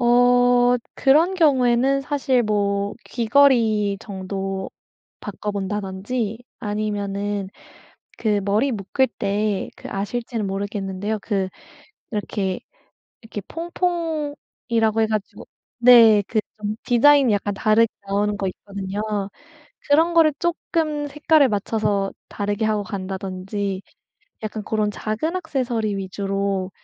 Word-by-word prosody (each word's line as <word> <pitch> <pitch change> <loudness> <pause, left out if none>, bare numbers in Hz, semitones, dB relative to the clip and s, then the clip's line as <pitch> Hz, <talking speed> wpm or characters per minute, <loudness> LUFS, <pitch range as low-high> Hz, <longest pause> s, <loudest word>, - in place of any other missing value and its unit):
어 245 0 +5 0.2
그런 315 +7 +4
경우에는 270 -4 +3
사실 275 -3 +1
뭐 200 -1 0
귀걸이 230 -5 +3
정도 195 -1 -4 0.5
바꿔본다든지 205 +2 -3 0.2
아니면은 205 -1 -2 0.7
그 210 -2 +1
머리 215 +7 +1
묶을 225 +5 0
때 205 0 -1
그 - - -9
아실지는 220 +2 -3
모르겠는데요. 200 +1 -3
그 195 -3 -1 0.6
이렇게, 200 -3 -2 0.6
이렇게 215 -2 -6
퐁퐁이라고 310 -10 -2
해가지고 215 -2 -2 0.3
네. 230 -4 +8
그 225 - +1 0.2
좀 210 0 -3
디자인이 265 0 +5
약간 205 0 0
다르게 215 +3 +4 0.2
나오는 205 +1 0
거 195 -1 -2
있거든요. 200 +1 -5 0.9
그런 320 +4 +4
거를 320 -3 +5
쪼끔 320 -3 -1
색깔을 295 -1 +3
맞춰서 205 -1 0 0.2
다르게 205 +1 -2
하고 215 -1 +1
간다든지 195 0 -4 0.6
약간 215 0 -4
고런 215 -1 -1
작은 220 - -2
액세서리 245 - -1
위주로 195 0 -2
215 Hz, 250 characters per minute, -22 LUFS, 200-250 Hz, 0.9 s, 네